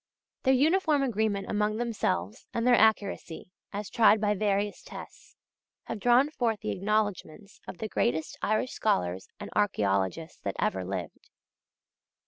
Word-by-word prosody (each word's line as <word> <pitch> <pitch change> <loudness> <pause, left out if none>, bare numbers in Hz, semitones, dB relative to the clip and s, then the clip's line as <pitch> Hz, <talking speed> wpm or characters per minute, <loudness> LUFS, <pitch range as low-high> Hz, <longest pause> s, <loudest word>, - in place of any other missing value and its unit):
Their 265 0 +4
uniform 310 +1 +3
agreement 215 -5 0
among 210 0 0
themselves, 210 - -2
and 230 - 0
their 250 - +5
accuracy, 205 -6 +1 0.2
as 205 0 -4
tried 220 0 +5
by 210 0 +2
various 205 0 0
tests, - - -11 0.5
have - - -5
drawn 245 +7 +4
forth 230 -7 -1
the - - -2
acknowledgments 205 -2 -2
of - - -7
the 220 - -4
greatest 160 -7 -1
Irish 215 +4 0
scholars 90 - 0
and - - -7
archæologists 105 - 0
that 100 - -3
ever 95 -1 0
lived. 90 -3 -6
210 Hz, 135 wpm, -28 LUFS, 165-230 Hz, 0.5 s, their